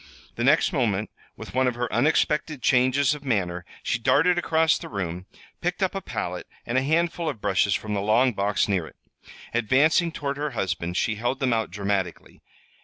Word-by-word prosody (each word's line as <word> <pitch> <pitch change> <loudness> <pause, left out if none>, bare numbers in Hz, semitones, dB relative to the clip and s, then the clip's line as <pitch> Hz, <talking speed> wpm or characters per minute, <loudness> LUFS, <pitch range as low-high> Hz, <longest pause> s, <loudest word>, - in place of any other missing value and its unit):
The - - -3
next - - +3
moment, 110 -4 0 0.3
with - - -9
one 130 0 +2
of 125 - 0
her 120 0 -2
unexpected 150 +2 +1
changes 130 +3 +3
of 150 -1 -8
manner, 90 -9 -1 0.2
she 120 - -1
darted 145 +9 +3
across 160 -2 +2
the - - -8
room, 90 -3 -4 0.3
picked - - -1
up - - 0
a - - -3
palette, - - -5 0.2
and 120 - -3
a 130 - +4
handful 165 +3 0
of 130 - -5
brushes 100 -1 +2
from 105 -1 -4
the 100 - -1
long 115 +5 +3
box 100 0 +1
near 95 -6 0
it. - - -15 0.6
Advancing 140 +9 +3
toward 140 -3 -4
her 150 0 -2
husband 90 -2 -2
she 110 -2 0
held 120 +4 -1
them 130 -3 +1
out 110 -2 0
dramatically. 100 0 -3
120 Hz, 185 wpm, -25 LUFS, 100-140 Hz, 0.6 s, a